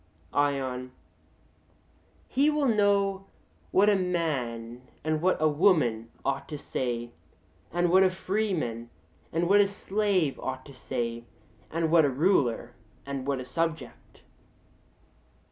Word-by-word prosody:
ION: 130 Hz, -3 st, -1 dB, 1.3 s
He 280 Hz, +4 st, +3 dB
will 300 Hz, -2 st, +1 dB
know 200 Hz, -3 st, +2 dB, 0.4 s
what 200 Hz, +2 st, +4 dB
a 210 Hz, -, +5 dB
man 130 Hz, -11 st, -2 dB, 0.2 s
and 155 Hz, 0 st, 0 dB
what 185 Hz, +2 st, +2 dB
a 155 Hz, -, +4 dB
woman 145 Hz, -, +2 dB, 0.2 s
ought 140 Hz, 0 st, -2 dB
to 150 Hz, -, -4 dB
say, 120 Hz, -4 st, -3 dB, 0.6 s
and 175 Hz, 0 st, +1 dB
what 190 Hz, +1 st, +6 dB
a 190 Hz, -, +5 dB
freeman 185 Hz, -, -2 dB, 0.4 s
and 170 Hz, +2 st, 0 dB
what 205 Hz, +2 st, +6 dB
a 200 Hz, -, +3 dB
slave 200 Hz, -6 st, 0 dB
ought 130 Hz, 0 st, -5 dB
to 140 Hz, -, -12 dB
say, 115 Hz, -2 st, -4 dB, 0.4 s
and 165 Hz, 0 st, -1 dB
what 165 Hz, -1 st, +6 dB
a 145 Hz, -, +3 dB
ruler 130 Hz, -, +1 dB, 0.3 s
and 140 Hz, -1 st, -5 dB
what 140 Hz, -2 st, 0 dB
a 130 Hz, -, -6 dB
subject. 160 Hz, -1 st, -4 dB
155 Hz, 130 wpm, -28 LUFS, 130-190 Hz, 1.3 s, what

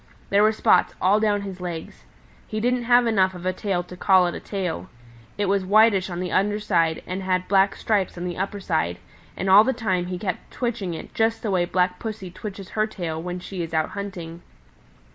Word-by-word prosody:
There 200 Hz, +1 st, +5 dB
were 215 Hz, +1 st, +5 dB
spots 220 Hz, -, +3 dB
all 200 Hz, +3 st, +4 dB
down 205 Hz, -2 st, +1 dB
his 190 Hz, -2 st, -7 dB
legs. 170 Hz, -3 st, -6 dB, 0.4 s
He 215 Hz, -, -3 dB
didn't 245 Hz, +1 st, 0 dB
have 245 Hz, 0 st, +5 dB
enough 190 Hz, -5 st, +2 dB
of 180 Hz, 0 st, -9 dB
a 185 Hz, -, +1 dB
tail 185 Hz, -2 st, -2 dB
to 180 Hz, +1 st, -11 dB
call 185 Hz, 0 st, +4 dB
it 175 Hz, -, -1 dB
a -, -, -5 dB
tail. 180 Hz, -, -4 dB, 0.5 s
It 205 Hz, -, 0 dB
was 195 Hz, 0 st, +1 dB
whitish 200 Hz, -1 st, +4 dB
on 175 Hz, -1 st, -4 dB
the 180 Hz, -1 st, -3 dB
under 205 Hz, +2 st, +1 dB
side 170 Hz, -6 st, +1 dB
and 185 Hz, +1 st, -4 dB
had 185 Hz, -1 st, 0 dB
black 195 Hz, 0 st, +3 dB
stripes 200 Hz, -5 st, 0 dB
on 175 Hz, -, -4 dB
the 175 Hz, -1 st, -3 dB
upper 200 Hz, +2 st, -3 dB
side, 160 Hz, -, -1 dB, 0.4 s
and 195 Hz, -, -2 dB
all 195 Hz, +3 st, +8 dB
the 265 Hz, -, +1 dB
time 185 Hz, -7 st, -1 dB
he 180 Hz, 0 st, -4 dB
kept 185 Hz, -1 st, -4 dB
twitching 220 Hz, -8 st, -3 dB
it -, -, -9 dB
just 225 Hz, 0 st, 0 dB
the 215 Hz, -, -1 dB
way 180 Hz, -2 st, +2 dB
Black 180 Hz, 0 st, 0 dB
Pussy 215 Hz, -5 st, -6 dB
twitches 195 Hz, +1 st, -8 dB
her 215 Hz, 0 st, 0 dB
tail 170 Hz, -6 st, -4 dB
when 180 Hz, +1 st, -4 dB
she 180 Hz, 0 st, -6 dB
is 165 Hz, -1 st, -4 dB
out 155 Hz, 0 st, +1 dB
hunting. 175 Hz, -5 st, -7 dB
190 Hz, 220 wpm, -24 LUFS, 180-210 Hz, 0.5 s, all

